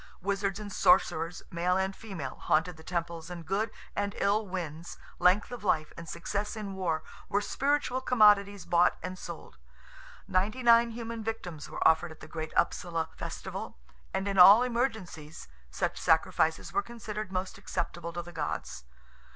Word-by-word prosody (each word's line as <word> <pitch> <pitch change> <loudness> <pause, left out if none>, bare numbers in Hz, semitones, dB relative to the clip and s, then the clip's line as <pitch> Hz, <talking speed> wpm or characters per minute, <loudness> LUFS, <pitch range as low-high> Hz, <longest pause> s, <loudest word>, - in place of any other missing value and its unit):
Wizards 195 +1 -1
and 205 -2 -7
sorcerers, 175 -2 +3
male 180 +1 +1
and 190 0 -1
female, 185 - -7
haunted 160 +3 +1
the 160 - -14
temples, 170 -1 -4
and 170 -2 -7
good 205 +5 0 0.3
and 205 -1 -2
ill 205 +2 +1
winds, 170 -3 -5 0.2
length 190 +6 +4
of 245 -4 -7
life, 155 -6 +1
and 165 -1 -9
success 200 +6 -3
in 210 -3 -5
war, 175 -4 -1 0.3
were 205 - +2
spiritual 270 +4 0
commodities 205 -5 +4
bought 175 0 +3
and 185 0 -4
sold. - - -9 0.7
Ninety 205 +7 0
nine 235 0 +6
human 230 -1 -6
victims 180 -9 -5
were - - +2
offered 160 +1 +3
at 160 - -13
the - - -10
great 160 -1 -5
Upsala 165 -2 0
festival, - - -6 0.3
and 195 - -2
in 195 -1 0
all 200 +6 +10
emergencies 220 - -3 0.2
such - - -2
sacrifices 160 0 +2
were 400 - +2
considered 215 - -6
most 185 +1 -3
acceptable 170 -3 -4
to 175 +1 -5
the 175 0 -11
gods. 65 - -4
190 Hz, 160 wpm, -30 LUFS, 170-210 Hz, 0.7 s, all